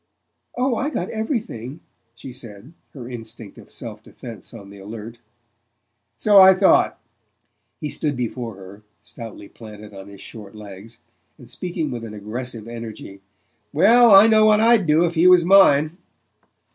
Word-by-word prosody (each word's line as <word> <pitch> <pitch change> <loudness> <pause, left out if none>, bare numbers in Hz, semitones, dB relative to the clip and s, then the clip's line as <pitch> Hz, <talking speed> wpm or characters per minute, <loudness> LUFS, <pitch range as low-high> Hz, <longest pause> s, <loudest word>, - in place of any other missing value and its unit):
"Oh, 250 0 0
I 275 +5 -2
got 185 - -5
everything," 220 - -5 0.4
she 125 +1 -11
said, 115 +2 -13 0.2
her 125 -4 -9
instinct 115 -3 -10
of - - -17
self - - -10
defense 115 -5 -12
on 100 -4 -13
the 100 - -14
alert. 110 +3 -10 1.0
"So 205 -2 +4
I 190 0 +8
thought." 190 0 +2 0.8
He 150 -3 -5
stood 145 -4 -3
before 120 -2 -5
her, 95 +2 -14 0.2
stoutly 115 -4 -10
planted 105 -2 -13
on 95 0 -11
his 100 -1 -14
short 105 -1 -12
legs, 105 +2 -12 0.4
and 125 - -16
speaking 175 -3 -5
with 120 -2 -6
an 110 -2 -9
aggressive 115 +2 -7
energy. 110 -4 -10 0.5
"Well, 230 +9 +5
I 195 0 +8
know 220 -1 +4
what 215 -1 +4
I'd 225 -4 +3
do 155 +3 +3
if 170 - -3
he 165 +2 +3
was 180 -2 +5
mine." 175 -3 +4
125 Hz, 155 wpm, -20 LUFS, -, 1.0 s, I